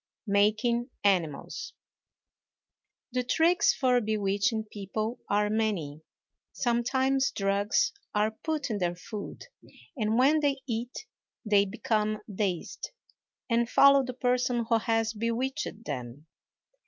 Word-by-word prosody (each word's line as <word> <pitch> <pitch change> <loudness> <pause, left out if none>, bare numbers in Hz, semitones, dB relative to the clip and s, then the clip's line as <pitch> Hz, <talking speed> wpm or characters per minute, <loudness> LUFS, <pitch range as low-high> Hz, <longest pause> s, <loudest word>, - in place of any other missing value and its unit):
MAKING 215 +4 +2
ANIMALS. 190 - 0 1.4
The 250 0 0
tricks 330 +7 +3
for 250 -2 +2
bewitching 210 0 0
people 215 +3 -4
are 210 +1 +2
many. 205 -9 -1 0.5
Sometimes 260 +3 +1
drugs 200 +1 +1 0.2
are 210 +1 +2
put 295 +3 -3
in 210 - -1
their 175 -1 0
food, 205 +3 -8 0.5
and 220 -3 0
when 280 +5 +5
they 285 -2 +1
eat 240 - -4 0.4
they 205 -2 +4
become 215 0 -1
dazed, 190 -4 -3 0.6
and 235 -1 +1
follow 275 +1 +6
the 255 -1 -6
person 245 -1 +1
who 230 -1 +3
has 225 0 0
bewitched 230 +2 -3
them. 130 +1 -6
225 Hz, 110 wpm, -28 LUFS, 205-250 Hz, 1.4 s, follow